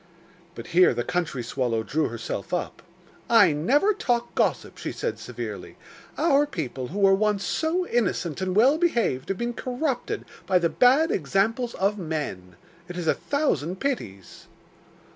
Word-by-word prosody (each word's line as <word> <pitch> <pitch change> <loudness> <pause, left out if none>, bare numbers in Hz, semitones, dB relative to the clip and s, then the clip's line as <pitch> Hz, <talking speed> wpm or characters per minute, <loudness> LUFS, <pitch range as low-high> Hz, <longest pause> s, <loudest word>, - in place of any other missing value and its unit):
But - - -8
here 180 +1 +5
the 120 - -1
country 165 -7 -2
swallow 115 -1 -1
drew 155 +6 0
herself 115 - -4
up. 175 - -4 0.5
'I 215 -7 +6
never 270 - +2
talk 240 -9 -1
gossip,' - - -1
she - - -4
said - - -4
severely. - - -7 0.4
'Our 295 -3 +3
people, 135 - -4
who 185 - -7
were 195 -1 +5
once 205 0 +1
so 335 +3 0
innocent 190 - -1
and 185 -1 -1
well 265 +9 +5
behaved, 235 - 0
have 195 - -1
been 240 0 -2
corrupted 255 +2 -3 0.2
by 185 - +4
the 170 -1 +2
bad 270 - +4
examples 210 - 0
of 200 +2 0
men. 145 - -4 0.3
It 180 0 -7
is 175 - -3
a - - +4
thousand 190 - -1
pities. 100 - -4
195 Hz, 155 wpm, -25 LUFS, 155-250 Hz, 0.5 s, I